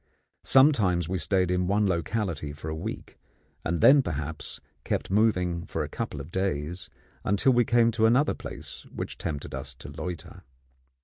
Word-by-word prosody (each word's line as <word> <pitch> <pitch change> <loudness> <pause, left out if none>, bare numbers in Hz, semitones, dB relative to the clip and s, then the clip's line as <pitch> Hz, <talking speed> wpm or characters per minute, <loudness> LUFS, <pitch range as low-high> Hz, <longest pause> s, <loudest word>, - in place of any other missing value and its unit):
Sometimes 110 - +4
we 95 +1 -1
stayed 90 +2 +1
in 90 0 +1
one 105 +2 +2
locality 85 -4 -1
for 75 +1 -7
a 80 - -3
week, 80 - -6 0.4
and 85 -1 -1
then 140 +1 +8
perhaps 80 - -5 0.2
kept - - -2
moving 90 -5 +2
for - - -2
a - - -5
couple - - -4
of 70 +5 -8
days, 90 -2 -2 0.3
until 100 +7 +3
we 120 -1 +4
came 115 0 +4
to 110 0 +3
another 130 +6 +3
place - - -8
which - - -6
tempted 75 -3 -4
us 65 0 -6
to - - -10
loiter. 90 -4 -7
90 Hz, 165 wpm, -27 LUFS, 80-110 Hz, 0.4 s, then